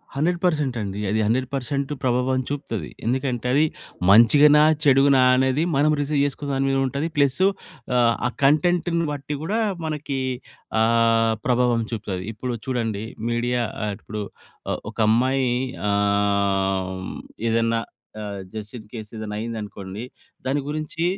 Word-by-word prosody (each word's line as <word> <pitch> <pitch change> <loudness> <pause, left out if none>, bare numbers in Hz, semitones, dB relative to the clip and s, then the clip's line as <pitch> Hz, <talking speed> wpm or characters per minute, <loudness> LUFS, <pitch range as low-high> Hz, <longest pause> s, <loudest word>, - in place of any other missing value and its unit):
100% 155 -3 +1
అండి. 100 -1 -4
అది 110 +2 +1
100% 135 +4 -1
ప్రభావం 130 +1 +1
చూపుతది. 140 -7 -4 0.2
ఎందుకంటే 125 0 -1
అది 150 +3 +4 0.4
మంచిగానా? 145 +8 +7 0.2
చెడుగానా? 135 -1 +5
అనేది 130 +3 +2
మనం 145 +2 +3
రిసీవ్ 145 0 0
చేసుకునే 145 0 -4
దాని 135 0 +1
మీద 135 - +1
ఉంటది. 140 +4 -2
ప్లస్సు 145 +6 +3 0.5
ఆహ్, 120 -1 +4 0.3
కంటెంట్‌ని 170 +3 +3
బట్టి 145 0 -4
కూడా 210 +7 0 0.3
మనకి 150 -3 -3 0.6
ఆహ్, 115 0 +3
ప్రభావం 125 -2 +2
చూపుతది. 95 -5 -4
ఇప్పుడు 125 +3 -4
చూడండి, 115 -5 -1 0.3
మీడియా 120 +1 0 0.2
ఆహ్, 105 - -1
ఇప్పుడు 105 0 -5 0.7
ఒక - - -23
అమ్మాయి 130 +3 +2 0.4
ఆమ్ 100 -2 +1 0.4
ఏదన్నా 115 0 +2 0.4
ఆహ్, 100 -2 -5
జస్ట్ 110 +1 -7
ఇన్ 110 -2 -12
కేస్ 110 -3 -7
ఏదైనా 110 -1 -5
అయింది 115 +1 -4
అనుకోండి. 100 +1 -7 0.4
దాని 135 +3 +1
గురించి 155 +2 -3
125 Hz, 125 wpm, -23 LUFS, 110-140 Hz, 0.7 s, మంచిగానా